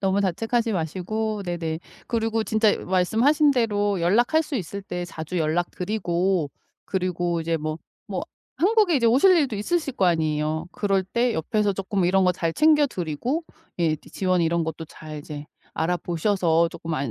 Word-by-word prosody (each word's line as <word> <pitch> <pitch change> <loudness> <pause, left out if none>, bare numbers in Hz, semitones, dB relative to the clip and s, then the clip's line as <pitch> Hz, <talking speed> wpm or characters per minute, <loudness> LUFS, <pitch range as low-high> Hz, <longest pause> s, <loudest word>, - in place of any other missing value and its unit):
너무 195 +1 +1
자책하지 225 +5 0
마시고 200 +5 -2
네네 165 -3 -3 0.3
그리고 225 -1 0
진짜 215 +1 +2
말씀하신 235 +11 +3
대로 205 -5 +1
연락할 240 - +3
수 290 - -4
있을 200 +1 -5
때 180 -2 -4
자주 170 +1 -5
연락 165 +2 0
드리고 180 -4 -1 0.3
그리고 175 -2 -1
이제 165 0 0
뭐 155 +1 -4 0.3
뭐 185 -3 -3 0.3
한국에 380 0 +3
이제 235 -3 +2
오실 270 +12 +5
일도 275 -8 +1
있으실 285 +5 -1
거 195 - +1
아니에요. 155 -1 0
그럴 195 -2 +1
때 235 +4 0
옆에서 205 +5 0
쪼금 195 -1 -1
이런 190 +1 +3
거 180 - +4
잘 165 -1 -2
챙겨 300 - +4
드리고 235 - -3 0.3
예 165 -3 +2
또 155 - -14
지원 185 -2 +1
이런 165 0 +1
것도 160 0 -5
잘 155 -1 -9
이제 145 0 -8 0.3
알아 175 +3 0
보셔서 170 -1 +1
쪼끔 165 0 -7
안 140 -4 -2
185 Hz, 335 characters per minute, -24 LUFS, 165-225 Hz, 0.3 s, 오실